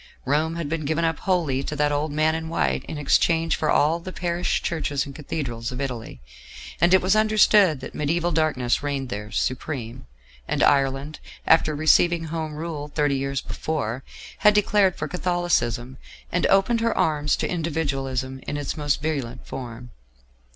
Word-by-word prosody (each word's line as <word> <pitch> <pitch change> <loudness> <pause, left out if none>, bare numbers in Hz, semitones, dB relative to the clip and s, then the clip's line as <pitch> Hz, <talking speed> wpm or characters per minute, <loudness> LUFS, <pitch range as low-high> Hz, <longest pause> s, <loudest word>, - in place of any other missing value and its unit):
Rome 155 +4 +1
had 170 -3 -3
been 160 +1 -2
given 160 +3 0
up 165 -2 -1
wholly 165 -8 0
to 150 - -4
that 145 0 +1
old 145 +1 -1
man 155 +2 +2
in 160 0 -4
white 165 - 0
in 155 - -6
exchange 165 +2 +2
for 155 - -1
all 160 +3 +3
the 185 +2 -8
parish 175 -1 -1
churches 150 -4 -1
and 140 - -9
cathedrals 130 -6 -4
of 125 - -6
Italy, 120 - -5 0.6
and 175 - +5
it 190 -1 +5
was 190 +2 +3
understood 210 -7 +4
that 135 - -8
mediaeval 170 +4 0
darkness 150 -7 +1
reigned 140 -3 -3
there 105 -2 -5
supreme; 125 - -3 0.4
and - - 0
Ireland, 140 +1 +2 0.3
after 155 -1 +4
receiving 165 +2 +3
Home 160 -1 -4
Rule 155 -2 -5
thirty 145 -1 0
years 135 0 -2
before, 135 -5 -3 0.4
had 210 -1 +5
declared 205 -2 +3
for 150 - -4
Catholicism, 175 -8 -1 0.3
and 180 - +1
opened 200 +4 +3
her 230 0 0
arms 150 -2 +2
to - - -2
Individualism 135 -6 -2
in 145 - -2
its 145 -2 -3
most 145 -2 -1
virulent 135 -6 -3
form. 120 -1 -8
150 Hz, 165 wpm, -24 LUFS, 135-165 Hz, 0.6 s, and